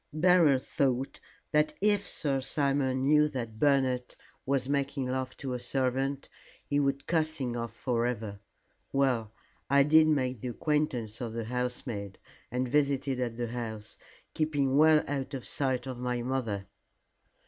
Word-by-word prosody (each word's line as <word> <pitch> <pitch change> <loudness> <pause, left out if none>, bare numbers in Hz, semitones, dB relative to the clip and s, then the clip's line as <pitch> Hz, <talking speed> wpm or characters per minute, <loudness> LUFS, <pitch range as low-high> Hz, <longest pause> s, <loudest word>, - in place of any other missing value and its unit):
Beryl 160 -3 +5
thought 130 0 -1 0.3
that 150 0 +2
if 205 -1 +2
Sir 135 -6 0
Simon 135 -1 +1
knew 150 +2 +5
that 115 -6 -5
Bernard 130 -3 +2 0.3
was 135 -1 +1
making 140 -1 -1
love 130 0 -3
to 130 -2 -4
a 125 - -3
servant, 135 +2 -1 0.4
he 145 - +1
would 140 0 0
cast 160 -1 0
him 125 -3 -2
off 115 -1 -3
for 120 -2 0
ever. 110 -4 -4 0.5
Well, 125 -6 +1 0.4
I 140 +1 +6
did 155 +2 +6
make 130 -6 0
the - - -4
acquaintance 125 -4 -1
of 115 -2 -4
the 115 -1 -3
housemaid 120 -4 -3 0.3
and 125 +1 -1
visited 140 -1 +1
at 120 -2 -2
the 120 -1 -2
house, 110 -3 -5 0.4
keeping 145 -4 +1
well 155 +1 +6
out 140 -1 -3
of 130 - -6
sight 130 -3 0
of 130 -2 -6
my 125 -1 -2
mother." 115 -6 -2
130 Hz, 150 wpm, -29 LUFS, 125-145 Hz, 0.5 s, I